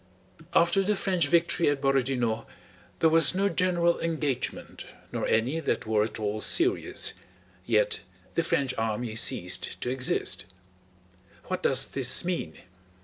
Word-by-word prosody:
After 170 +3 +4
the 205 +2 +1
French 185 -5 +1
victory 170 0 +3
at 145 -1 0
Borodinó 130 -4 0 0.5
there 160 - +6
was 165 +1 +5
no 195 +1 +2
general 175 -2 +1
engagement 155 -6 -3 0.2
nor - - -2
any 125 +8 +1
that - - -1
were 110 -1 +2
at 110 - -4
all 105 0 -2
serious, 365 - +1 0.5
yet - - +2 0.3
the - - +2
French 135 -2 0
army 110 +1 -2
ceased 90 -5 -1
to 125 - -1
exist. 130 0 -1 1.0
What 185 - -3
does 130 -1 +3
this 130 +5 0
mean? 170 - -2
140 Hz, 135 wpm, -27 LUFS, 120-175 Hz, 1.0 s, there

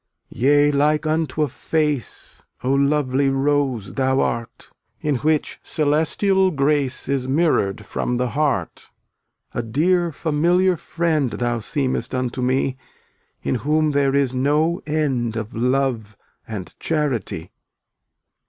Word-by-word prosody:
299 130 +4 +1 0.2
Yea, 145 - +3
like 150 +2 +2
unto 155 0 0
a - - +1
face, 150 0 -2 0.2
O 130 +2 +1
lovely 140 -1 +2
Rose 135 -6 0
thou 130 0 +1
art, 115 -1 -3 0.3
In 150 -3 0
which 155 +3 0
celestial 160 +6 +1
grace 140 -4 0
Is 135 -2 -1
mirrored 135 - +1
from 125 - -2
the 125 0 0
heart. 135 - -1 0.6
A - - -1
dear 170 +9 +1
familiar 170 +5 +2
friend 160 -4 0
Thou 120 0 -1
seemest 130 +2 -2
unto 125 0 -2
me, 130 +1 0 0.7
In - - 0
whom 155 +1 +2
there 140 -1 +2
is 140 -3 +2
no 150 +7 +1
end 135 -7 0
Of 110 -1 -4
love 120 -3 0 0.3
and 105 -5 -6
charity. 130 - -2
140 Hz, 125 wpm, -21 LUFS, 125-155 Hz, 0.7 s, Yea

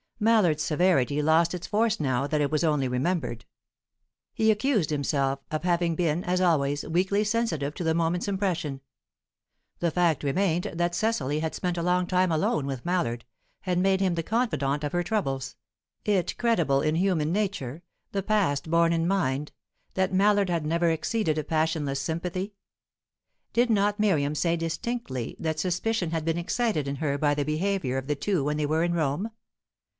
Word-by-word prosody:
Mallard's 210 -9 +3
severity 150 -4 +2
lost 160 +3 +3
its 180 - -6
force 220 +1 +1
now 130 -2 0
that 150 +1 0
it 145 - 0
was 155 +1 +1
only 150 -5 +2
remembered. 125 -1 -2 0.9
He 220 - +2
accused 215 - +1
himself 140 -2 0
of 155 +1 -2
having 175 -2 +1
been, 170 0 0
as 180 +1 0
always, 145 -5 +2
weakly 190 +5 +1
sensitive 205 -10 -1
to - - -4
the 160 -1 +2
moment's 170 +3 0
impression. 180 -8 -2 1.0
The 170 - +1
fact 170 -3 +1
remained 175 +4 0
that 175 +1 0
Cecily 155 -10 0
had 160 0 -2
spent 180 -2 -2
a 170 - -1
long 180 +1 +2
time 185 0 +2
alone 155 -2 +1
with 135 -1 -5
Mallard, 165 -11 -1 0.4
had 180 -2 -1
made 190 +1 +3
him 190 -2 +1
the 165 - -1
confidant 150 - 0
of 145 - -2
her 175 - 0
troubles; 135 -10 -2 0.5
it 200 -4 0
credible 170 - +2
in 155 +1 +1
human 170 -4 +1
nature 175 - -2 0.3
the 195 -1 -2
past 175 -9 +1
borne 170 0 +4
in 165 0 +1
mind 150 -7 0 0.4
that 190 0 0
Mallard 200 0 +3
had 170 -3 -1
never 170 +2 +2
exceeded 165 0 0
a - - -2
passionless 155 -3 0
sympathy? 180 +7 -3 1.0
Did 240 +1 +3
not 205 0 +2
Miriam 155 -9 +2
say 170 +2 +1
distinctly 165 - -3
that 160 -1 -2
suspicion 185 +1 0
had 160 -1 -2
been 165 +1 0
excited 175 - -1
in 140 0 -3
her 145 -2 -1
by 145 -1 +2
the 145 -1 -1
behaviour 155 -3 -1
of 135 0 -4
the 150 - 0
two 170 +2 0
when 150 +1 -1
they 150 - 0
were 160 +2 +1
in 175 0 0
Rome? 165 +6 -1
170 Hz, 175 wpm, -27 LUFS, 150-190 Hz, 1.0 s, borne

